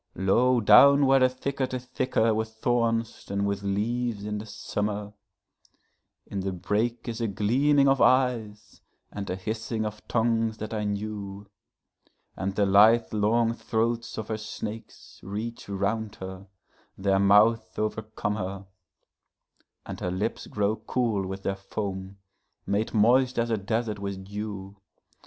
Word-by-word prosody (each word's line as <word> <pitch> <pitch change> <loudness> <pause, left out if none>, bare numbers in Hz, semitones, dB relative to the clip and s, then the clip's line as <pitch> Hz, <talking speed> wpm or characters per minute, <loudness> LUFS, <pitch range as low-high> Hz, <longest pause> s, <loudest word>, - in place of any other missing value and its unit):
Low 120 +7 +3
down 140 +7 +7
where 135 0 +5
the 130 0 +5
thicket 130 0 -3
is 125 0 -6
thicker 125 -3 +1
with 110 +1 -1
thorns 115 -1 0
than 100 0 -1
with 100 -1 -1
leaves 105 +2 -1
in 105 0 -3
the 110 - -8
summer, 105 0 -3 1.1
In 100 - -5
the 95 0 -2
brake 110 +7 -2
is 115 0 -4
a 115 - +1
gleaming 135 +8 +3
of 135 -1 +3
eyes 120 -5 +1 0.3
and 100 -1 -6
a 90 - -1
hissing 110 +3 -3
of 105 0 -5
tongues 115 -1 +1
that 110 +1 -6
I 105 -1 -2
knew; 100 -1 -4 0.9
And 95 0 -3
the 105 - +3
lithe 110 +5 +5
long 115 +2 +2
throats 115 0 -2
of 110 -1 -5
her 110 -1 -2
snakes 110 0 -8
reach 105 +4 -6
round 105 +2 -2
her, 95 +1 -8 0.5
their 95 0 +2
mouths 105 +3 +4
overcome 110 -1 -2
her, 95 0 -5 1.2
And - - -7
her 90 - -2
lips 95 +5 -3
grow 105 +1 0
cool 110 -7 -1
with 95 +1 -6
their 95 - -1
foam, 95 -1 -5 0.5
made 105 +4 -1
moist 125 +4 +4
as 115 0 0
a - - +3
desert 110 +1 -2
with 100 -1 -5
dew. 100 -1 -6
110 Hz, 145 wpm, -27 LUFS, 100-115 Hz, 1.2 s, down